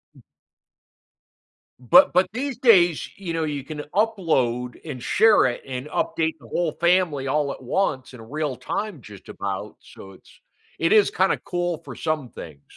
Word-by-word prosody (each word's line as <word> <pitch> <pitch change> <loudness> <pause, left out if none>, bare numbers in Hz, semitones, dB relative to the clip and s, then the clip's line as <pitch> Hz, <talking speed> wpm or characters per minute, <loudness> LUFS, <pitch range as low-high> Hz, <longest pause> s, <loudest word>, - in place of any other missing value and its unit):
B - - -18 1.6
But 125 -3 +6
but 180 +2 +3
these 260 0 -3
days, 180 - +4
you 190 -4 -5
know, 165 -1 -1
you 145 -3 -4
can 150 +2 -8 0.2
upload 155 - 0
and 130 - -7
share 215 - +4
it 120 - -1
and 130 +1 -6
update 160 +1 -1
the - - -16
whole 170 -3 -1
family 170 -6 +1
all 145 +1 0
at - - -13
once 130 -3 -1
in 120 - -11
real 145 +2 -4
time 175 +5 -4
just 105 -4 -14
about. 100 +1 -5
So, 95 - -13
it's 95 - -20 0.4
it 165 - +1
is 215 -2 +5
kinda 190 +1 +1
cool 175 -1 -2
for - - -8
some 155 -5 -2
things. 70 -3 -11
155 Hz, 165 wpm, -23 LUFS, 125-185 Hz, 1.6 s, But